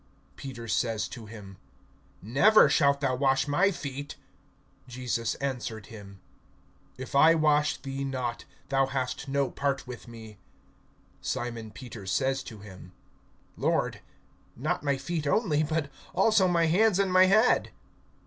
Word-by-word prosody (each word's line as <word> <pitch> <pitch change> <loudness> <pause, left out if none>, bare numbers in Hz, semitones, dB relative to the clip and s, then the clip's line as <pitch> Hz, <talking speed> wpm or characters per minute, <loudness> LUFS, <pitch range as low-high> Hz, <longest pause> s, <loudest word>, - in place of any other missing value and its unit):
(8)Peter 125 -4 -8
says 110 0 0
to 115 -3 -9
him: 100 -3 -11 0.7
Never 145 - +5
shalt 140 -1 +3
thou 135 -3 +1
wash 135 +1 +1
my 175 +7 +3
feet. 145 -5 -6 0.7
Jesus 125 -2 -2
answered 120 -6 -4
him: 100 -3 -11 0.8
If 130 +2 -8
I 160 +4 +6
wash 150 -1 +2
thee 135 0 -5
not, 130 -3 -3 0.2
thou 135 -1 +2
hast 130 0 -3
no 140 0 0
part 140 -1 -2
with 125 -1 -9
me. 110 -3 -12 0.8
(9)Simon 115 -2 -4
Peter 115 -6 -9
says 135 +7 0
to 110 -3 -10
him: 95 -3 -12 0.6
Lord, - - 0 0.6
not - - -2
my 140 -2 0
feet 155 +2 -3
only, 155 -3 +2
but 155 -2 -1 0.2
also 215 -4 +4
my 170 -2 +2
hands 190 +5 +3
and 195 -2 +1
my 185 0 +7
head. 215 +5 +3
135 Hz, 135 wpm, -28 LUFS, 115-150 Hz, 0.8 s, my